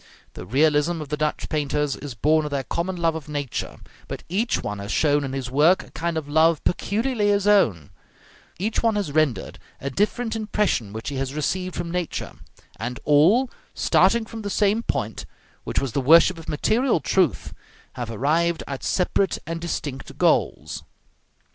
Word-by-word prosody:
The 90 - -9
realism 150 - +2
of 150 -3 -7
the 150 - -1
Dutch 155 0 -1
painters 150 -2 -1
is 140 -5 -8
born 155 +7 +3
of 150 - -3
their 140 -2 -2
common 175 +7 -2
love 165 -2 +1
of 155 -2 -7
nature: 145 -4 -4 0.3
but - - -6
each 215 +7 0
one 105 0 -4
has 100 +2 -5
shown 145 -1 +2
in 135 -1 -4
his 130 -2 -4
work 155 +7 +4
a - - -17
kind 170 0 -2
of 155 -2 -4
love 160 +2 +3
peculiarly 215 +4 0
his 200 -1 +2
own; 115 - +3 0.7
each 215 +5 -1
one 225 -2 +2
has 200 -8 -1
rendered 155 -5 0 0.2
a 140 - -4
different 220 - 0
impression 210 - 0
which 110 +4 -5
he 140 - -4
has 135 +1 -3
received 180 +4 -2
from 170 - -4
nature; 180 -1 -3 0.5
and 120 +4 -4
all, 180 - +4 0.2
starting 235 -1 +3
from 225 0 -8
the 205 - -4
same 205 +3 +2
point, 110 - -3 0.4
which - - 0
was 135 -3 -2
the 140 - 0
worship 165 +5 +6
of 165 - -9
material 230 - +2
truth, 180 - 0 0.4
have 120 -2 -5
arrived 155 +8 +1
at 140 -2 -5
separate 190 +1 +1
and 165 0 -4
distinct 145 -5 -5
goals. 70 +4 +1
155 Hz, 175 wpm, -23 LUFS, 140-190 Hz, 0.7 s, worship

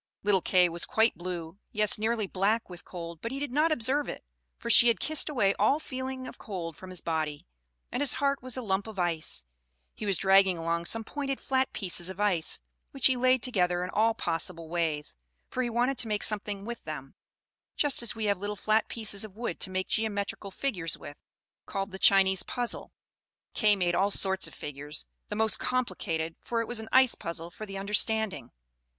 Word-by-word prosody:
Little 200 -2 +3
Kay 180 0 +4
was 170 0 -2
quite 220 +1 +3
blue, 175 0 -6
yes 210 0 +4
nearly 220 0 0
black 200 +3 0
with 175 0 -9
cold; 170 -2 -8
but 230 - -4
he 270 - -3
did 285 -2 -3
not 305 +5 +2
observe 285 +1 +2
it, - - -7 0.3
for - - -8
she 235 0 +7
had 235 - +3
kissed 310 -1 +3
away 205 -9 +2
all 290 - +3
feeling 260 -2 -5
of - - -10
cold 175 -6 -6
from 185 - -11
his 180 -3 -6
body, 155 -3 -2 0.5
and 250 - -2
his 285 - +4
heart 280 0 0
was 255 0 -3
a 255 - -3
lump 195 0 -1
of 220 -2 -9
ice. 165 - 0 0.5
He 215 - -6
was 195 -3 +2
dragging 190 0 +5
along 170 +1 -1
some 225 +5 0
pointed 275 +2 -4
flat 265 0 0
pieces 180 -3 0
of 190 +1 -8
ice, 185 -6 +3 0.3
which 270 -3 -1
he 260 - +6
laid 255 -1 +3
together 180 -7 +1
in 180 - -4
all 225 +1 +2
possible 165 -3 -1
ways, 160 -3 -2 0.3
for 255 - -2
he 245 - -1
wanted 245 +3 0
to 240 - -1
make 210 -1 -1
something 205 -1 +1
with 235 +1 -6
them; 135 -4 -7 0.6
just 290 -4 +3
as 235 - 0
we 220 -1 -3
have 200 -2 +1
little 205 +1 -3
flat 215 +2 +1
pieces 215 -3 +1
of 210 -3 -9
wood 235 +2 -4
to 190 - 0
make 185 0 -2
geometrical 205 -2 -2
figures 190 -7 -2
with, 145 - -11 0.5
called 195 0 -3
the 190 - -8
Chinese 190 -1 +5
Puzzle. 245 -1 -3 0.6
Kay 210 -2 +4
made 180 -3 0
all 195 +3 +2
sorts 190 -1 +3
of - - -10
figures, 145 +1 -6 0.2
the 210 - -3
most 220 -1 +2
complicated, 165 -10 -2
for 235 - -2
it 230 - -2
was 240 -2 -1
an 220 - -8
ice 260 -1 +5
puzzle 170 0 -4
for 215 +4 -8
the 195 -1 -6
understanding. 205 - +1
205 Hz, 205 wpm, -29 LUFS, 180-235 Hz, 0.6 s, she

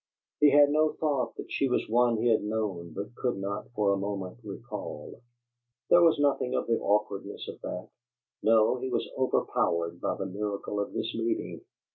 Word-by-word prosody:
He 150 - +7
had 145 0 +6
no 155 +1 +3
thought 145 -5 -1
that - - -8
she 135 - +1
was 125 - 0
one 120 +1 +3
he 120 +2 +2
had 110 - +3
known 105 -5 -3
but 100 +4 -6
could 120 -3 -2
not, 100 +1 -4
for 105 -2 +2
the 100 - +2
moment, 100 0 -4
recall; 110 +3 -7 0.7
there 175 - +8
was 165 -2 +5
nothing 140 -3 +1
of - - 0
the 115 -1 +1
awkwardness 100 -1 -1
of - - -8
that; 90 - -5 0.5
no, 110 +2 +4
he 130 +1 -4
was - - -1
overpowered 85 -9 0
by - - -1
the - - -3
miracle 100 +1 -3
of 100 - -3
this 115 - -2
meeting. 115 0 -2
110 Hz, 180 wpm, -29 LUFS, 100-125 Hz, 0.7 s, there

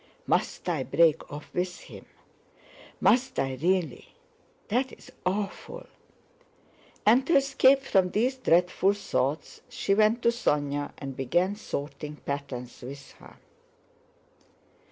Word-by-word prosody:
"Must - - -1
I 165 -6 0
break 155 +5 +2
off 145 +1 -9
with 180 0 -2
him? - - -12 0.9
Must 260 +2 +3
I 135 -1 0
really? 175 -5 -1 0.5
That's 250 +4 -2 0.2
awful..." 205 - -3 1.2
and 245 +5 +5
to 335 - +3
escape 275 0 +4
from 190 -7 +2
these 250 +7 0
dreadful 180 -2 +3
thoughts 150 -7 -2
she 195 - 0
went 215 +3 +3
to - - +5
Sónya 145 -10 -1
and 135 -1 -6
began 175 +10 +1
sorting 150 -6 -6
patterns 140 -4 -6
with 140 +2 -9
her. - - -15
180 Hz, 115 wpm, -27 LUFS, 145-230 Hz, 1.2 s, and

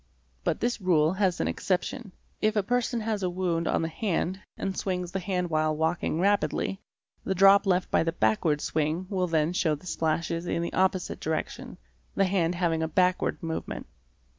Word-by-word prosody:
But - - -1
this 240 -2 0
rule 165 -3 +3
has 190 -2 +1
an 80 - 0
exception. 185 - -2 0.3
If 215 0 +2
a 210 - +2
person 245 +1 0
has 215 -2 -2
a 185 - 0
wound 175 -2 -1
on - - +1
the - - 0
hand, 185 +1 -1 0.2
and 195 -1 -3
swings 180 -2 -2
the 190 - -2
hand 180 -2 -2
while 155 0 +1
walking 160 0 0
rapidly, 200 0 +1 0.4
the 190 - -1
drop 195 +2 +6
left 180 -1 +1
by - - +4
the 165 - 0
backward 150 +3 +1
swing 155 +4 -1
will 185 -2 +1
then 160 0 +1
show 160 -4 +1
the 150 - -15
splashes 165 0 -1
in 170 - -1
the 170 - -4
opposite 185 0 0
direction, 160 0 -4 0.4
the 195 - +3
hand 180 -2 +1
having 170 -2 0
a 160 - 0
backward 180 +2 +1
movement. 160 -1 -4
180 Hz, 185 wpm, -27 LUFS, 160-195 Hz, 0.4 s, drop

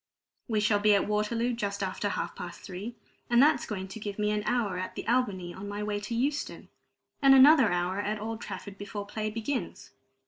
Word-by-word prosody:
We 220 -4 +1
shall 210 0 +3
be 210 0 +5
at 200 - +1
Waterloo 225 +3 0
just 200 -3 -3
after 195 +2 -2
half - - -3
past 175 - -8
three, 200 +5 -7 0.3
and 240 0 +4
that's 285 -1 +4
going 190 -3 -4
to 195 - -8
give 205 -2 -5
me 210 0 +1
an 210 0 0
hour 215 -7 0
at 185 - -5
the - - -6
Albany 205 -8 0
on 195 +2 -8
my 205 +1 -4
way 210 0 -2
to 210 +3 -4
Euston, 280 +5 -2 0.5
and 270 -1 +7
another 265 - +7
hour 180 +2 0
at 210 +1 -2
Old 225 +1 -5
Trafford 195 0 -7
before 205 0 -5
play 215 +1 -3
begins. 230 +4 -4
210 Hz, 205 wpm, -29 LUFS, 200-235 Hz, 0.5 s, and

